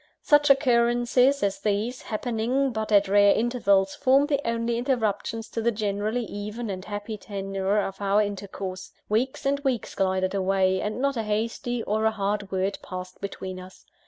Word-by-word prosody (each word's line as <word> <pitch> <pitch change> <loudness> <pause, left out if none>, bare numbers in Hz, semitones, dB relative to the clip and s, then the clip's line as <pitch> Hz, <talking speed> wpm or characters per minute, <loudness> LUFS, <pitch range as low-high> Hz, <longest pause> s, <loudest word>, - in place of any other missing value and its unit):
Such 295 -1 +4
occurrences 250 0 +3
as 200 -1 0
these, 215 +4 -1
happening 245 +4 -1
but 220 -1 -3
at 200 -1 +5
rare 205 +1 +5
intervals, 200 -5 +2
formed 280 +2 +3
the 285 -1 +1
only 230 0 -1
interruptions 225 -3 -1
to 230 - -3
the 235 - +2
generally 215 +2 -1
even 210 +2 -5
and 185 -1 -5
happy 205 +1 -5
tenour 195 0 -2
of 195 -1 -4
our 200 +1 +3
intercourse. 195 -2 -6 0.2
Weeks 245 +7 0
and 280 +1 +1
weeks 265 -6 -2
glided 185 -1 0
away, 190 -1 +1
and 215 +3 -3
not 275 -1 0
a - - +1
hasty 225 +2 -2
or 215 +2 0
a - - +5
hard 205 -1 -2
word 190 +1 -1
passed 185 0 -8
between 190 -2 -6
us. 185 +1 -13
215 Hz, 165 wpm, -26 LUFS, 195-240 Hz, 0.2 s, at